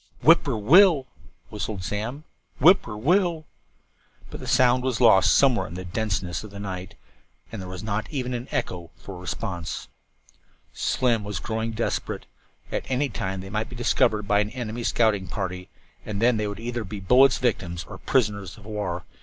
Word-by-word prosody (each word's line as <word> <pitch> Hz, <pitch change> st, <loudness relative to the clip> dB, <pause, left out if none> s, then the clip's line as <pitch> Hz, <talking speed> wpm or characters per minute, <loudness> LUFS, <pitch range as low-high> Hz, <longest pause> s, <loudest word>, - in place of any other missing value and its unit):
"Whip -, -, +7 dB
poor -, -, -1 dB
will 135 Hz, -, +7 dB
l 170 Hz, -, 0 dB
l," -, -, -35 dB, 0.4 s
whistled 105 Hz, -2 st, -4 dB
Slim. 115 Hz, +10 st, -4 dB, 0.4 s
"Whip 180 Hz, +8 st, +7 dB
poor 105 Hz, -2 st, -7 dB
will 170 Hz, -, +4 dB
l 180 Hz, -, +1 dB
l." 155 Hz, -1 st, -13 dB, 0.9 s
But -, -, -7 dB
the -, -, -8 dB
sound 125 Hz, 0 st, +4 dB
was 130 Hz, -3 st, -1 dB
lost 110 Hz, -6 st, +6 dB
somewhere 135 Hz, -4 st, +3 dB
in 85 Hz, -, -9 dB
the 95 Hz, 0 st, -6 dB
denseness 95 Hz, -3 st, -2 dB
of 110 Hz, -, -9 dB
the 100 Hz, 0 st, -10 dB
night, 95 Hz, -2 st, -6 dB, 0.6 s
and 110 Hz, -4 st, -6 dB
there 90 Hz, -, -7 dB
was 90 Hz, +1 st, -7 dB
not 105 Hz, 0 st, -2 dB
even 130 Hz, -4 st, -3 dB
an 120 Hz, +1 st, -4 dB
echo 85 Hz, -2 st, -3 dB
for 95 Hz, -3 st, -10 dB
response. 90 Hz, -2 st, -5 dB, 0.8 s
Slim 120 Hz, -4 st, +1 dB
was 100 Hz, -2 st, -4 dB
growing 110 Hz, +4 st, -3 dB
desperate. 115 Hz, +2 st, -3 dB, 0.5 s
At -, -, -3 dB
any 135 Hz, +2 st, +1 dB
time 95 Hz, -4 st, -4 dB
they 95 Hz, +1 st, -9 dB
might 110 Hz, +1 st, -2 dB
be 125 Hz, -, -9 dB
discovered 110 Hz, -3 st, +1 dB
by 105 Hz, 0 st, +3 dB
an 105 Hz, 0 st, 0 dB
enemy 120 Hz, -1 st, -5 dB
scouting 110 Hz, -5 st, +2 dB
party, 90 Hz, -1 st, -5 dB, 0.3 s
and 105 Hz, -2 st, -4 dB
then 120 Hz, +1 st, +3 dB
they 105 Hz, -1 st, -1 dB
would 100 Hz, 0 st, -6 dB
either 120 Hz, 0 st, -3 dB
be 105 Hz, +1 st, -7 dB
bullets' 125 Hz, +8 st, +5 dB
victims 90 Hz, -8 st, -1 dB
or -, -, -11 dB
prisoners 100 Hz, -7 st, 0 dB
of 105 Hz, -, -15 dB
war. 105 Hz, -5 st, -3 dB
105 Hz, 190 wpm, -25 LUFS, 95-120 Hz, 0.9 s, Whip